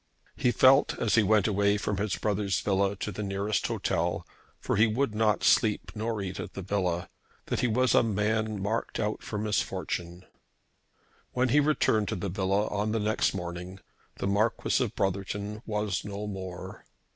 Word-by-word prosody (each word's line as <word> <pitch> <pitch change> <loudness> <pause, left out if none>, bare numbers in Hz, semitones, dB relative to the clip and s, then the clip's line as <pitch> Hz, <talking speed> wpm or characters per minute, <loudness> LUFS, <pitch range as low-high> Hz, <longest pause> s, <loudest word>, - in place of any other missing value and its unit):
He 125 - +2
felt 130 +3 +5
as 110 -3 0
he 115 - +6
went 105 -1 +3
away 100 0 +2
from 100 -1 -2
his 100 0 -1
brother's 100 -4 0
villa 100 0 +1
to 105 - -4
the 105 - -5
nearest 100 +1 -1
hotel, 85 +1 -1 0.3
for - - -1
he 110 +3 +5
would 115 +2 0
not 105 -1 +1
sleep 110 -3 +3
nor 110 -1 -2
eat 95 -1 -5
in - - -5
the 95 - -6
villa, 90 -3 -1 0.4
that - - -2
he 125 - +2
was 125 +2 +2
a - - +6
man 110 0 0
marked 110 +4 -2
out 105 -1 -1
for 105 - -5
misfortune. 90 -4 -2 1.1
When 125 +1 +1
he 145 - +5
returned 140 -8 +2
to - - -2
the 95 +2 -3
villa 100 +2 +1
on 105 +1 -1
the 115 - +1
next 110 -1 +1
morning 90 +1 -6 0.4
the - - -4
Marquis 105 +3 +1
of - - -4
Brotherton 100 +2 -2
was 105 -4 -1
no 105 0 -5
more. 95 -3 -7
105 Hz, 175 wpm, -28 LUFS, 95-110 Hz, 1.1 s, he